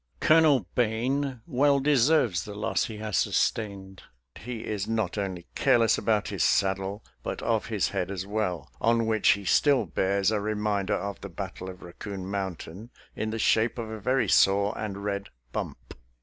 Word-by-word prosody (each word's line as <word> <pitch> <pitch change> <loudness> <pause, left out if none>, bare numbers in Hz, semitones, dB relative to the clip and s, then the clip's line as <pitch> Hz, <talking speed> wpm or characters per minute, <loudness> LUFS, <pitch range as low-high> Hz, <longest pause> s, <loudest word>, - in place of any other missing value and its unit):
Colonel 155 - +5
Bane 125 +3 0
well 140 -1 +3
deserves 135 - +3
the 105 - -8
loss 105 +2 0
he 110 -4 -7
has 105 -2 -2
sustained; 95 -3 -1 0.3
he 120 0 -7
is 105 -2 -3
not 110 -5 -1
only 95 -4 -4
careless 115 -2 +4
about 110 -2 0
his - - -1
saddle, 95 +2 +1 0.2
but - - -5
of 115 -2 0
his 105 -4 0
head 95 -2 -2
as 95 -1 -4
well, 100 -4 -2
on 115 0 +3
which 110 -2 +4
he 100 -1 -7
still 130 - +3
bears 95 +3 +1
a 105 -2 0
reminder 105 -1 0
of 100 0 -5
the 100 - -7
battle 95 0 -6
of 90 -1 -10
Raccoon 95 +2 -7
Mountain 95 +1 -5 0.3
in 110 - -2
the 110 - -3
shape 115 +2 +2
of 115 -2 -5
a 110 - -6
very 125 +2 +1
sore 100 +2 +4
and 100 -2 -5
red 100 -1 -3 0.2
bump. - - -6
105 Hz, 170 wpm, -27 LUFS, 95-115 Hz, 0.3 s, Colonel